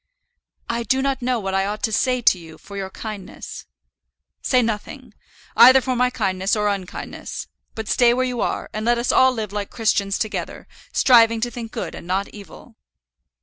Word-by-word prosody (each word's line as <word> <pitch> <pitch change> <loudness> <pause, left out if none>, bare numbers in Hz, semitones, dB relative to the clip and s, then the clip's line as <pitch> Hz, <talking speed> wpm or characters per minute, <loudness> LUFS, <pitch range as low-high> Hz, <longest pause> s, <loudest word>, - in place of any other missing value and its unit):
"I 235 0 -2
do 260 +3 +1
not 275 -1 -1
know 245 -1 0
what 195 -2 -4
I 195 0 +1
ought 210 +1 -5
to 220 - +1
say 250 +3 +1
to 185 - +4
you 160 -2 -12
for 200 - -12
your 195 -1 -4
kindness." 205 0 -8 0.7
"Say 255 -2 +2
nothing, 230 +5 -5 0.4
either 260 +2 +9
for 255 0 -2
my 250 +1 +2
kindness 190 -4 -1
or 210 -1 +1
unkindness; 195 -3 -5 0.3
but 220 -1 -5
stay 240 -1 +4
where 255 +2 +1
you 250 -2 -3
are, - - -2
and 215 - -3
let 240 +1 +2
us 240 +1 0
live 225 -6 +2
like 205 -1 -3
Christians 200 -3 0
together, 215 - -4 0.2
striving 230 -3 +5
to 240 +1 -1
think 230 -1 -7
good - - -5
and - - -10
not 190 +2 -1
evil." 210 +3 -13
225 Hz, 185 wpm, -22 LUFS, 200-245 Hz, 0.7 s, either